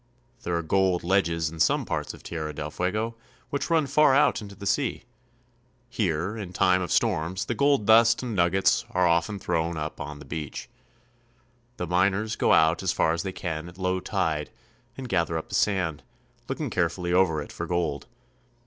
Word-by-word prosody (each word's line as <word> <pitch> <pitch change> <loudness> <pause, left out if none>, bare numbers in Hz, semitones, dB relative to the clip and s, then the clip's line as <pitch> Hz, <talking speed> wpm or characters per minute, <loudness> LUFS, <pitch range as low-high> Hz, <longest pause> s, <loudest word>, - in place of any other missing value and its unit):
There 85 - -2
are 85 - -2
gold 95 +1 +1
ledges 85 -3 +1
in 80 - -10
some 85 - +2
parts - - -3
of - - -17
Tierra 80 -3 -5
del 75 0 -5
Fuego 105 +7 -2 0.4
which 140 - -2
run 165 -3 +3
far 140 0 +4
out 145 - +3
into 100 -1 -10
the 100 - -9
sea. 130 +6 0 0.9
Here 95 -3 -1
in 100 -5 -7
time 90 0 +3
of 90 - -4
storms 95 -4 0
the - - -2
gold 140 -1 +2
dust 115 +2 +5
and 120 -4 -3
nuggets 90 +1 +3
are 90 0 +1
often 85 +4 +1
thrown 85 -2 -1
up 75 0 -5
on 75 0 -6
the - - -12
beach. 75 -2 -6 1.1
The 90 - -3
miners 95 +5 +1
go - - +2
out 80 +2 +4
as 95 - +1
far 80 - +2
as 85 - -2
they 95 - -4
can 85 -2 -5
at 85 - -15
low 95 0 0
tide 80 -4 -1 0.5
and 130 -1 -6
gather 85 -5 0
up 80 - -6
the - - -10
sand, 90 -7 0 0.5
looking - - -3
carefully 85 0 -1
over 90 -4 +3
it 75 - -7
for - - -5
gold. 85 -3 -2
90 Hz, 185 wpm, -26 LUFS, 80-105 Hz, 1.1 s, dust